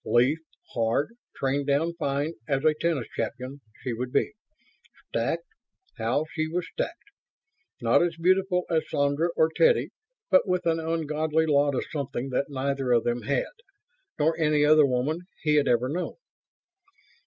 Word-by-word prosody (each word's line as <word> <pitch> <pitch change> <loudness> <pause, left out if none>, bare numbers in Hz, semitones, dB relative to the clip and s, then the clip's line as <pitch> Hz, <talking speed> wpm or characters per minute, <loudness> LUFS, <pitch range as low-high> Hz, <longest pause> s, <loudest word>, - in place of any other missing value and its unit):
Lithe, 125 +6 +3 0.4
hard, 115 - +1 0.2
trained 140 +1 -1
down 150 +4 +2
fine 145 -1 -1
as 135 +1 0
a 155 - +6
tennis 155 -5 -1
champion, 130 +5 -4 0.2
she 125 - -2
would 125 +2 -4
be. - - +1 0.8
Stacked - - -1 0.5
how 120 +7 +1
she 155 0 -1
was 175 +2 -2
stacked! 345 +5 -5 0.7
Not - - +4
as 175 -1 +1
beautiful 180 +1 +2
as 160 -2 0
Sandra 145 +4 +1
or 160 0 +4
Teddy... 485 -1 +4 0.4
but 280 - +5
with 180 -1 0
an 165 -1 +2
ungodly 160 -1 0
lot 145 -2 +3
of - - -1
something 135 -3 -3
that 135 +2 -1
neither 135 -1 -1
of 120 -2 +4
them 120 0 -1
had... - - -1 0.7
nor 160 +1 +2
any 150 -2 +3
other 150 -1 +6
woman 130 +6 0 0.2
he 150 -1 +3
had 145 -1 +3
ever 120 +1 +3
known. 170 +7 -3
150 Hz, 155 wpm, -27 LUFS, 135-165 Hz, 0.8 s, a